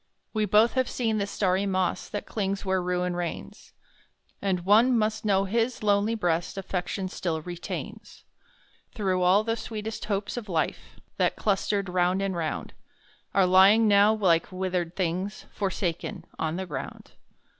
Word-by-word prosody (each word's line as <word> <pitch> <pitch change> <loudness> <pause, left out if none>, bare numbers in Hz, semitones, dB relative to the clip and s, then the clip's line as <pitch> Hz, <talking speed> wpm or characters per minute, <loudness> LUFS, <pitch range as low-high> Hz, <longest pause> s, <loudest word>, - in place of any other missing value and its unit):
We 215 -1 +1
both 210 +4 +4
have 260 -1 +1
seen 225 -3 -1
the 200 - -1
starry 195 0 0
moss 185 -2 -1
That 205 - -4
clings 200 -2 -3
where 190 -1 +1
Ruin 180 0 -1
reigns, 175 -1 -6 0.7
And 190 -3 0
one 225 +7 +5
must 220 0 -1
know 195 -2 +3
his 230 +4 -1
lonely 205 +2 +2
breast 175 -4 -1
Affection 190 0 -3
still 170 -3 -3
retains; 175 0 -7 0.7
Through 190 -4 0
all 185 +4 +4
the 225 +1 0
sweetest 220 -1 -5
hopes 205 +2 -2
of 220 -4 -6
life, 165 -3 -2 0.2
That - - +2
clustered 200 -1 0
round 180 +1 +1
and 195 -2 -1
round, 160 -3 -3 0.6
Are 195 - +5
lying 195 +5 +6
now, 205 +1 +6
like 190 -7 +2
withered 180 -2 -2
things, 185 +3 -2
Forsaken 185 -4 -3
on 160 0 -1
the 190 +1 -3
ground. 160 -6 -7
195 Hz, 150 wpm, -27 LUFS, 180-210 Hz, 0.7 s, lying